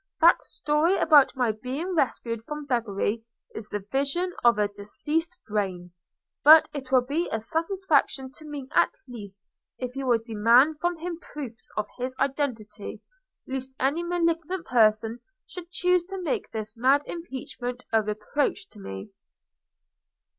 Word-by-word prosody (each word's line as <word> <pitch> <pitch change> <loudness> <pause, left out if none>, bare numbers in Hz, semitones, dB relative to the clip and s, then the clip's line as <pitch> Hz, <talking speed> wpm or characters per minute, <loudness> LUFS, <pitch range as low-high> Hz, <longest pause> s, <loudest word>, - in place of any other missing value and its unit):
That 335 +1 +6
story 305 +6 +1
about 295 -4 +5
my 245 -3 +2
being 260 - -4
rescued 235 -7 0
from 300 +4 -6
beggary 225 -3 -1 0.3
is 220 -1 -7
the 205 -2 -4
vision 285 +7 0
of 235 -2 +5
a 210 -1 +2
diseased 255 +12 -3
brain. 190 -4 -2 0.5
But 310 +2 +9
it 270 -3 -6
will 255 -2 +5
be 315 +7 -1
a 220 - 0
satisfaction 315 - 0
to 310 - -11
me 290 -3 -6
at - - +3
least 205 -5 -9 0.3
if 250 0 -5
you 270 -1 -3
will 240 -2 +5
demand 230 +7 +4
from 350 +1 0
him 340 +1 -5
proofs 265 -9 -8
of 210 - +1
his 255 +1 -3
identity, 230 -7 -3 0.4
lest 265 0 -5
any 280 +6 +1
malignant 345 0 -1
person 225 -1 +3 0.3
should 350 -2 -9
choose 360 0 +2
to 385 +1 -6
make 340 -6 -2
this 220 0 -6
mad 265 +5 +3
impeachment 255 -6 -6
a 220 - +5
reproach 215 - -2
to 210 - -14
me." 95 - -8
265 Hz, 145 wpm, -26 LUFS, 225-320 Hz, 0.5 s, But